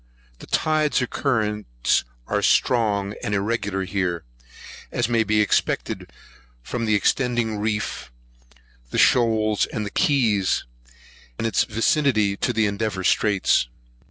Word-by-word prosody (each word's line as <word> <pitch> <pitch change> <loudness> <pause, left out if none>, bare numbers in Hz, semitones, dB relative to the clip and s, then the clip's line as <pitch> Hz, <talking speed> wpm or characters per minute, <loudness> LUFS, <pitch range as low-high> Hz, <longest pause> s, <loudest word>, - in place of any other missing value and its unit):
The - - -12
tides 155 -1 +1
or - - +1
currents 105 - -1 0.2
are - - -1
strong 105 -4 +2
and 105 - -1
irregular 100 -2 -1
here, 90 -3 -2 0.7
as 120 -2 0
may 115 -2 +2
be 105 0 +2
expected, 105 - -1 0.5
from 115 - -3
the 110 -1 +2
extending 120 0 0
reefs, 105 - -3 0.9
shoals, 110 -4 +3
and 105 -4 -5
keys, 110 -9 +2 0.7
and - - -3
its 115 - +2
vicinity 110 -2 +1
to - - 0
Endeavour 105 -2 -1
Straits. 100 - +2
110 Hz, 110 wpm, -23 LUFS, 100-115 Hz, 0.9 s, shoals